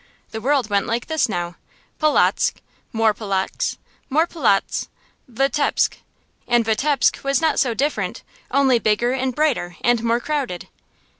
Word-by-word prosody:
The 220 Hz, -, -5 dB
world 270 Hz, -1 st, +1 dB
went 200 Hz, -2 st, 0 dB
like 235 Hz, +1 st, -1 dB
this 315 Hz, -6 st, 0 dB
now: 175 Hz, -3 st, -3 dB, 0.4 s
Polotzk 305 Hz, -1 st, +3 dB, 0.4 s
more 225 Hz, -1 st, +2 dB
Polotzk 195 Hz, -3 st, -2 dB, 0.3 s
more 310 Hz, +4 st, +3 dB
Polotzk 260 Hz, -, 0 dB, 0.4 s
Vitebsk! 275 Hz, +4 st, +1 dB, 0.5 s
And 240 Hz, -2 st, +3 dB
Vitebsk 270 Hz, +6 st, +1 dB
was 275 Hz, -1 st, +1 dB
not 320 Hz, -1 st, +1 dB
so 245 Hz, -4 st, +1 dB
different, 290 Hz, +5 st, -2 dB, 0.3 s
only 265 Hz, -3 st, +3 dB
bigger 220 Hz, +3 st, +1 dB
and 260 Hz, -1 st, -1 dB
brighter 260 Hz, -, 0 dB
and 240 Hz, -1 st, +2 dB
more 235 Hz, +1 st, +2 dB
crowded. 265 Hz, -, -3 dB
240 Hz, 135 wpm, -21 LUFS, 220-280 Hz, 0.5 s, Polotzk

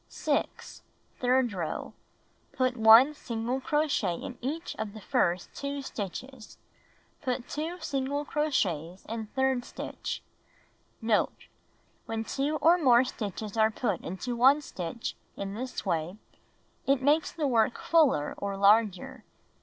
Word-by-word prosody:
6. -, -, -2 dB, 0.4 s
Third 250 Hz, -2 st, +2 dB
row: 170 Hz, -5 st, -4 dB, 0.6 s
Put 255 Hz, -1 st, +1 dB
1 230 Hz, +5 st, +8 dB
single 240 Hz, -1 st, -3 dB
crochet 290 Hz, -, +1 dB
in 250 Hz, -, -7 dB
each 305 Hz, +7 st, -4 dB
of 220 Hz, -1 st, -4 dB
the -, -, -7 dB
first 180 Hz, -3 st, 0 dB
2 280 Hz, 0 st, -4 dB
stitches. 230 Hz, +3 st, -7 dB, 0.6 s
Put 255 Hz, -3 st, -2 dB
2 320 Hz, +4 st, -4 dB
single 285 Hz, -1 st, -2 dB
crochets 185 Hz, -, -1 dB
in 225 Hz, 0 st, -5 dB
third 265 Hz, -2 st, +1 dB
stitch. -, -, -6 dB, 0.8 s
Note. 225 Hz, -2 st, +1 dB, 0.3 s
— -, -, -35 dB
Wlien 225 Hz, 0 st, -3 dB
2 285 Hz, +3 st, -1 dB
or 345 Hz, +2 st, +6 dB
more 250 Hz, -5 st, +6 dB
stitches 215 Hz, -4 st, -5 dB
are 220 Hz, -1 st, +4 dB
put 210 Hz, -3 st, -2 dB
into 215 Hz, +8 st, -4 dB
1 265 Hz, +5 st, +5 dB
stitch 185 Hz, 0 st, -5 dB, 0.2 s
in 195 Hz, 0 st, -4 dB
this 250 Hz, +3 st, -5 dB
way, 170 Hz, +1 st, -1 dB, 0.7 s
it 270 Hz, -1 st, +2 dB
makes 300 Hz, +3 st, +3 dB
the 315 Hz, -3 st, -2 dB
work 235 Hz, -2 st, +2 dB
fuller 295 Hz, -, +3 dB
or 200 Hz, -1 st, -3 dB
larger. 220 Hz, +5 st, +3 dB
245 Hz, 130 wpm, -29 LUFS, 210-275 Hz, 0.8 s, 1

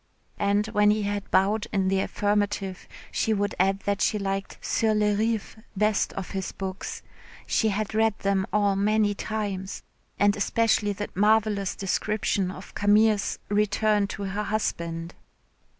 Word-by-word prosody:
And 205 Hz, +1 st, +2 dB
when 210 Hz, -1 st, +4 dB
he 210 Hz, 0 st, +2 dB
had 205 Hz, 0 st, -3 dB
bowed 210 Hz, +3 st, +2 dB
in 195 Hz, -1 st, +1 dB
the 190 Hz, 0 st, +2 dB
affirmative, 205 Hz, -1 st, -1 dB, 0.2 s
she 220 Hz, -, +1 dB
would 205 Hz, 0 st, -1 dB
add 195 Hz, +1 st, +2 dB
that 200 Hz, 0 st, -1 dB
she 215 Hz, -, +2 dB
liked 195 Hz, -1 st, -3 dB
"Sur 220 Hz, -1 st, +1 dB
les 210 Hz, -1 st, +2 dB
Rives" 220 Hz, 0 st, -1 dB, 0.2 s
best 210 Hz, 0 st, +2 dB
of 195 Hz, -, -6 dB
his 190 Hz, -2 st, -3 dB
books 190 Hz, 0 st, -6 dB, 0.4 s
"she 220 Hz, -, +1 dB
had 215 Hz, +1 st, -2 dB
read 220 Hz, -1 st, +2 dB
them 195 Hz, -1 st, 0 dB
all 205 Hz, -1 st, +2 dB
many 210 Hz, +1 st, +2 dB
times 200 Hz, -2 st, -4 dB, 0.3 s
and 205 Hz, 0 st, +3 dB
especially 210 Hz, 0 st, +1 dB
that 205 Hz, +1 st, -6 dB
marvellous 210 Hz, -1 st, +2 dB
description 200 Hz, -1 st, 0 dB
of 185 Hz, +1 st, -9 dB
Camille's 210 Hz, 0 st, +3 dB
return 210 Hz, 0 st, +2 dB
to 200 Hz, -, -6 dB
her 200 Hz, +2 st, -2 dB
husband." 170 Hz, -5 st, -2 dB
205 Hz, 150 wpm, -26 LUFS, 195-215 Hz, 0.4 s, when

